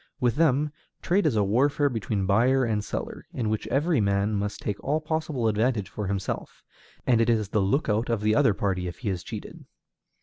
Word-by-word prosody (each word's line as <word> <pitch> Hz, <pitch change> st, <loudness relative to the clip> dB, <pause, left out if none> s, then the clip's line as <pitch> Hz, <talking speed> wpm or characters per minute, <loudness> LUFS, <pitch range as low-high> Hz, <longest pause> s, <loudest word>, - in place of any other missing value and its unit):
With 120 Hz, -2 st, +1 dB
them, 150 Hz, -2 st, +2 dB, 0.3 s
trade 185 Hz, 0 st, +2 dB
is 135 Hz, -, +1 dB
a 105 Hz, -, +3 dB
warfare 140 Hz, +8 st, +2 dB
between 110 Hz, -5 st, -2 dB
buyer 125 Hz, +7 st, +3 dB
and 110 Hz, -3 st, 0 dB
seller, -, -, -5 dB
in 115 Hz, -4 st, -1 dB
which 110 Hz, -, -2 dB
every 150 Hz, +1 st, +2 dB
man 100 Hz, +1 st, +1 dB
must 105 Hz, 0 st, -2 dB
take 105 Hz, -1 st, -4 dB
all 150 Hz, +3 st, +1 dB
possible 155 Hz, -6 st, -1 dB
advantage 110 Hz, -2 st, +1 dB
for 105 Hz, +1 st, -4 dB
himself, 95 Hz, -1 st, -4 dB, 0.4 s
and 120 Hz, -2 st, +4 dB
it 115 Hz, -, +2 dB
is 110 Hz, -4 st, +1 dB
the 105 Hz, -, +1 dB
lookout 110 Hz, +1 st, +1 dB
of 115 Hz, -3 st, 0 dB
the 110 Hz, 0 st, +2 dB
other 110 Hz, -2 st, +4 dB
party 95 Hz, -3 st, -1 dB
if 90 Hz, 0 st, -6 dB
he 115 Hz, -, -3 dB
is 90 Hz, -3 st, -2 dB
cheated. -, -, -8 dB
110 Hz, 200 wpm, -26 LUFS, 100-135 Hz, 0.4 s, and